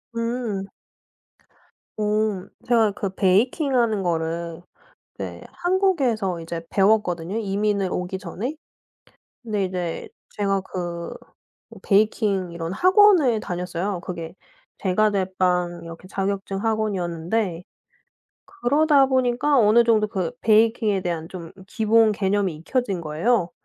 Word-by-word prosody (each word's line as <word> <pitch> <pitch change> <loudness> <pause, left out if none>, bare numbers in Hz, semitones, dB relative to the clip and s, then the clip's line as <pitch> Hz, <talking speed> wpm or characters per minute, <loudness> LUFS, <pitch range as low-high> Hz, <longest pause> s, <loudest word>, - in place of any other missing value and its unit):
음. 230 -4 -2 1.3
옴. 210 -2 0 0.2
제가 230 -3 +4
그 195 0 -3
베이킹 245 - +2
하는 220 -5 +2
거를 165 0 -2 0.6
네 - - -6
한국에서 275 - +1
이제 165 0 -5
배웠거든요 195 -2 +1
이민을 200 -2 0
오기 180 +1 -3
전에. 210 - -5 0.9
근데 210 -4 -1
이제 180 -3 -4 0.2
제가 195 -1 0
그 175 -2 -5 0.6
뭐 225 - -12
베이킹 200 -3 +1
이런 170 0 -4
학원을 365 - +5
다녔어요. 180 0 -3
그게 170 -2 -7 0.4
제과 210 +3 +2
제빵 180 -3 0
이렇게 165 +2 -10
자격증 195 +1 -3
학원이었는데 190 -3 -1 0.8
그러다 295 -5 +3
보니까 260 +2 +2
어느 230 +1 +5
정도 220 -2 +3
그 190 -5 -2
베이킹에 220 -2 +3
대한 165 -2 -3
좀 170 -3 -9
기본 220 +1 +3
개념이 195 -3 0
익혀진 195 +2 -2
거예요. 170 +5 0
200 Hz, 250 characters per minute, -23 LUFS, 180-225 Hz, 1.3 s, 학원을